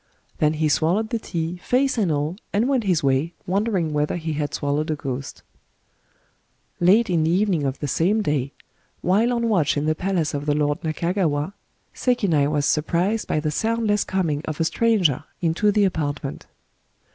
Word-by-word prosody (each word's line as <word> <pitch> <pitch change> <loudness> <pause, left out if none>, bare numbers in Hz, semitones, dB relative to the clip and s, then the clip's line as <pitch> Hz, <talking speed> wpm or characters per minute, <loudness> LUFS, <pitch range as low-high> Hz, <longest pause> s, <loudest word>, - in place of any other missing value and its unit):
— - - -36
then 150 0 +3
he 155 0 0
swallowed 175 +9 +1
the 230 - 0
tea, 170 -3 -4
fece 265 +2 +2
and 205 -8 +1
all, 150 +3 -1 0.2
and 215 +5 +1
went 260 -5 +1
his 180 -6 +1
way, 140 +5 +1
wondering 190 -4 0
whether 150 0 0
he 160 -2 -3
had 145 -1 -2
swallowed 145 +2 -1
a 155 - +1
ghost 135 -2 -6 1.4
Late 205 +7 +5
in 170 -4 +1
the 160 - +1
evening 180 -4 +1
of 135 0 -2
the 145 - -4
same 195 +10 +1
day, 140 -5 -1 0.5
while 210 +7 +2
on 235 -1 0
watch 175 -10 +2
in 145 - 0
the 155 - +2
palace 175 -2 -1
of 145 +1 -4
the 145 - +2
lord 145 +1 0
Nakagawa, 170 0 -1 0.4
Sekinai 195 - +1
was 145 -1 0
surprised 175 +9 0
by - - 0
the 150 0 -1
soundless 220 +2 +1
coming 165 -6 -1
of 155 -2 -5
a - - +3
stranger 180 - +2 0.2
into 175 +5 +2
the 205 0 +3
apartment. 145 -6 -3
165 Hz, 180 wpm, -23 LUFS, 150-205 Hz, 1.4 s, Late